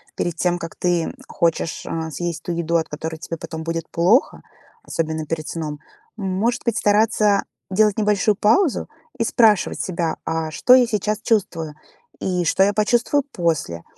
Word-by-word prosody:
перед 175 Hz, -, -2 dB
тем, 175 Hz, -1 st, 0 dB
как 165 Hz, -, -7 dB
ты, 175 Hz, -2 st, +1 dB
м, -, -, -5 dB
хочешь, 165 Hz, -1 st, -1 dB
а, 160 Hz, -1 st, -3 dB
съесть 170 Hz, +1 st, -4 dB
ту -, -, -3 dB
еду, 170 Hz, 0 st, -1 dB
от 165 Hz, -1 st, +1 dB
которой 160 Hz, +2 st, -5 dB
тебе 165 Hz, +1 st, -6 dB
потом 160 Hz, 0 st, -7 dB
будет 165 Hz, 0 st, -3 dB
плохо, 185 Hz, +11 st, +2 dB, 0.4 s
особенно 160 Hz, -1 st, -2 dB
перед 155 Hz, 0 st, -4 dB
сном. 150 Hz, -3 st, -4 dB, 0.4 s
Может 205 Hz, +5 st, -1 dB
быть, 235 Hz, -2 st, 0 dB
стараться 210 Hz, -1 st, +3 dB, 0.3 s
делать 210 Hz, +1 st, +3 dB
небольшую 210 Hz, 0 st, +2 dB
паузу 230 Hz, -, +2 dB, 0.3 s
и 230 Hz, -, +1 dB
спрашивать 220 Hz, -4 st, +3 dB
себя: 170 Hz, -3 st, -2 dB
"А 160 Hz, -1 st, -2 dB
что 250 Hz, -, +4 dB
я 255 Hz, -1 st, +6 dB
сейчас 210 Hz, -2 st, -1 dB
чувствую? 165 Hz, -8 st, 0 dB, 0.4 s
И 180 Hz, -2 st, -1 dB
что 170 Hz, +3 st, +1 dB
я 205 Hz, +1 st, +3 dB
почувствую 240 Hz, +6 st, +2 dB
после?". 155 Hz, -, -1 dB
175 Hz, 165 wpm, -21 LUFS, 165-210 Hz, 0.4 s, я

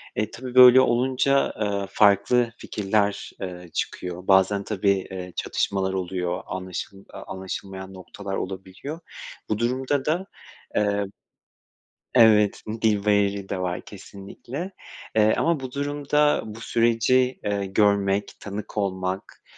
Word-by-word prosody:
E, 105 Hz, 0 st, -1 dB
tabii 125 Hz, 0 st, -8 dB
böyle 125 Hz, 0 st, +10 dB
olunca, 130 Hz, +2 st, +2 dB
eee, 100 Hz, -2 st, -1 dB
farklı 105 Hz, +4 st, +3 dB
fikirler, 100 Hz, 0 st, -1 dB
eee, 90 Hz, -2 st, -6 dB
çıkıyor. 90 Hz, 0 st, -4 dB
Bazen 95 Hz, +1 st, +4 dB
tabii, 100 Hz, -1 st, +1 dB, 0.2 s
eee, 90 Hz, -1 st, -7 dB
çatışmalar 95 Hz, -1 st, -1 dB
oluyor, 90 Hz, -1 st, -2 dB
anlaşıl 95 Hz, +1 st, -6 dB
eee, 95 Hz, -, -16 dB, 0.2 s
anlaşılmayan 95 Hz, 0 st, -6 dB
noktalar 95 Hz, +1 st, -7 dB
olabiliyor. 95 Hz, -, -6 dB, 0.5 s
Bu 110 Hz, -, 0 dB
durumda 130 Hz, +3 st, 0 dB
da, 170 Hz, +5 st, 0 dB, 0.5 s
eee 100 Hz, -1 st, +1 dB, 1.1 s
Evet, 110 Hz, -4 st, +5 dB, 0.2 s
dil 105 Hz, -2 st, +2 dB
bariyeri 100 Hz, -1 st, +1 dB
de 95 Hz, -, -2 dB
var 90 Hz, -1 st, -2 dB
kesinlikle, 105 Hz, -, -8 dB, 0.4 s
eee, 110 Hz, 0 st, +5 dB
ama 165 Hz, -3 st, +1 dB
bu 130 Hz, -1 st, -6 dB
durumda 145 Hz, +1 st, +1 dB
bu 110 Hz, +1 st, -8 dB
süreci, 120 Hz, +3 st, +2 dB
eee, 100 Hz, -1 st, -1 dB
görmek, 100 Hz, 0 st, +1 dB
tanık 105 Hz, +1 st, -7 dB
olmak, 95 Hz, -2 st, -3 dB
100 Hz, 120 wpm, -24 LUFS, 95-125 Hz, 1.1 s, böyle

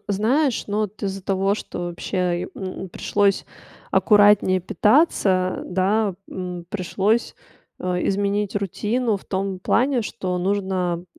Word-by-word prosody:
знаешь, 240 Hz, +7 st, +1 dB
ну, 205 Hz, +1 st, -2 dB
вот 210 Hz, 0 st, -4 dB
из-за 195 Hz, -1 st, -3 dB
того, 195 Hz, +1 st, +1 dB
что 175 Hz, -4 st, -6 dB
вообще, 175 Hz, +3 st, -5 dB, 0.3 s
э, -, -, -6 dB
м, 190 Hz, -1 st, -6 dB
пришлось 200 Hz, +2 st, +1 dB, 0.5 s
аккуратнее 205 Hz, -3 st, +5 dB
питаться, 190 Hz, -, +2 dB
да. 195 Hz, +2 st, +1 dB
М, 180 Hz, -2 st, -6 dB
пришлось, 205 Hz, +4 st, 0 dB, 0.4 s
э, 180 Hz, -1 st, -1 dB
изменить 200 Hz, +1 st, 0 dB
рутину 210 Hz, +3 st, -1 dB
в -, -, -13 dB
том 190 Hz, -1 st, -2 dB
плане, 250 Hz, +5 st, +2 dB
что 185 Hz, -4 st, -3 dB
нужно 185 Hz, -2 st, -1 dB
195 Hz, 125 wpm, -22 LUFS, 185-210 Hz, 0.5 s, аккуратнее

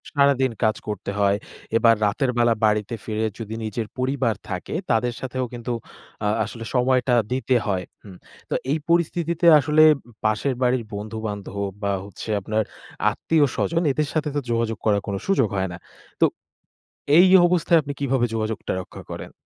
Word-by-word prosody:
সারাদিন 140 Hz, -2 st, +3 dB
কাজ 110 Hz, 0 st, +3 dB
করতে 100 Hz, -1 st, -4 dB
হয়। 100 Hz, 0 st, +3 dB, 0.4 s
এবার 115 Hz, -1 st, +5 dB
রাতের 125 Hz, +5 st, +1 dB
বেলা 120 Hz, -1 st, +4 dB
বাড়িতে 105 Hz, +1 st, +1 dB
ফিরে 110 Hz, 0 st, -1 dB
যদি 110 Hz, 0 st, -5 dB
নিজের 110 Hz, 0 st, -3 dB
পরিবার 130 Hz, -3 st, 0 dB
থাকে 90 Hz, +8 st, -4 dB, 0.2 s
তাদের 120 Hz, +1 st, +1 dB
সাথেও 130 Hz, -1 st, -3 dB
কিন্তু 120 Hz, 0 st, -4 dB, 0.5 s
আ -, -, +2 dB, 0.2 s
আসলে 115 Hz, +1 st, -7 dB
সময়টা 125 Hz, 0 st, +3 dB, 0.2 s
দিতে 130 Hz, 0 st, +1 dB
হয়। 95 Hz, -3 st, 0 dB, 0.2 s
হুম। 95 Hz, -3 st, -12 dB, 0.3 s
তো -, -, -1 dB, 0.2 s
এই 155 Hz, -, +2 dB
পরিস্থিতিতে 170 Hz, 0 st, +1 dB
আসলে 150 Hz, +2 st, +4 dB, 0.4 s
পাশের 110 Hz, +5 st, +1 dB
বাড়ির 125 Hz, -1 st, +2 dB
বন্ধু-বান্ধব 105 Hz, -1 st, -5 dB, 0.3 s
বা 100 Hz, -, +1 dB
হচ্ছে 100 Hz, +2 st, -9 dB
আপনার 110 Hz, +3 st, 0 dB, 0.5 s
আত্মীয়-স্বজন 160 Hz, +5 st, +1 dB
এদের 150 Hz, +2 st, 0 dB
সাথে 155 Hz, -1 st, 0 dB
তো -, -, +2 dB
যোগাযোগ 115 Hz, -2 st, 0 dB
করার 105 Hz, -2 st, +3 dB
কোনো 100 Hz, -1 st, -2 dB
সুযোগ 165 Hz, -, +3 dB
হয় 95 Hz, 0 st, -1 dB
না। 85 Hz, -, -7 dB, 0.4 s
তো -, -, +8 dB, 0.9 s
এই 180 Hz, +2 st, +8 dB, 0.2 s
অবস্থায় 170 Hz, -1 st, +3 dB
আপনি 145 Hz, 0 st, -5 dB
কীভাবে 135 Hz, -3 st, +1 dB
যোগাযোগটা 110 Hz, -1 st, -2 dB
রক্ষা -, -, -11 dB
করেন? -, -, -7 dB
120 Hz, 155 wpm, -23 LUFS, 110-140 Hz, 0.9 s, তো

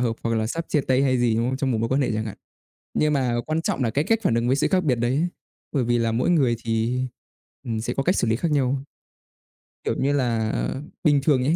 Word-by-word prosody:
hợp 115 Hz, -2 st, 0 dB
hoặc 115 Hz, 0 st, 0 dB
là 110 Hz, 0 st, 0 dB
sắp 165 Hz, +8 st, -3 dB
chia 150 Hz, -, +2 dB
tay 130 Hz, 0 st, +2 dB
hay 130 Hz, -2 st, +2 dB
gì, 120 Hz, -2 st, +2 dB
đúng 115 Hz, +2 st, +1 dB
không? 130 Hz, -, -2 dB
Trong 135 Hz, -1 st, -1 dB
một 115 Hz, -, 0 dB
mối 115 Hz, -, 0 dB
quan 135 Hz, +3 st, +1 dB
hệ 130 Hz, -, +1 dB
chẳng 110 Hz, 0 st, -1 dB
hạn. 105 Hz, -, -6 dB, 0.6 s
Nhưng 150 Hz, 0 st, +2 dB
mà 130 Hz, -4 st, +1 dB
quan 155 Hz, +1 st, -1 dB
trọng 140 Hz, -, -1 dB
là 115 Hz, -, +1 dB
cái 145 Hz, +6 st, 0 dB
cách 225 Hz, +5 st, +2 dB
phản 185 Hz, -, +2 dB
ứng 115 Hz, +1 st, +1 dB
với 130 Hz, -, +3 dB
sự 140 Hz, -, +2 dB
khác 185 Hz, -1 st, +2 dB
biệt 135 Hz, -6 st, +2 dB
đấy. 130 Hz, +8 st, +1 dB, 0.4 s
Bởi 135 Hz, -4 st, +1 dB
vì 120 Hz, 0 st, +2 dB
là 115 Hz, -1 st, +1 dB
mỗi 120 Hz, +8 st, +1 dB
người 135 Hz, -9 st, +3 dB
thì, 115 Hz, +3 st, 0 dB, 0.6 s
ừm, 110 Hz, -2 st, -2 dB
sẽ 120 Hz, +2 st, -2 dB
có 135 Hz, -, -1 dB
cách 185 Hz, -, +2 dB
xử -, -, +1 dB
lý 110 Hz, -, +2 dB
khác 155 Hz, +6 st, -1 dB
nhau. 135 Hz, -1 st, +1 dB, 1.0 s
Kiểu -, -, -1 dB
như 140 Hz, +2 st, +2 dB
là, 115 Hz, -5 st, +1 dB, 0.5 s
bình 145 Hz, -3 st, +4 dB
thường 135 Hz, -4 st, +3 dB
ấy, 150 Hz, +5 st, +2 dB
125 Hz, 265 wpm, -24 LUFS, 115-145 Hz, 1.0 s, bình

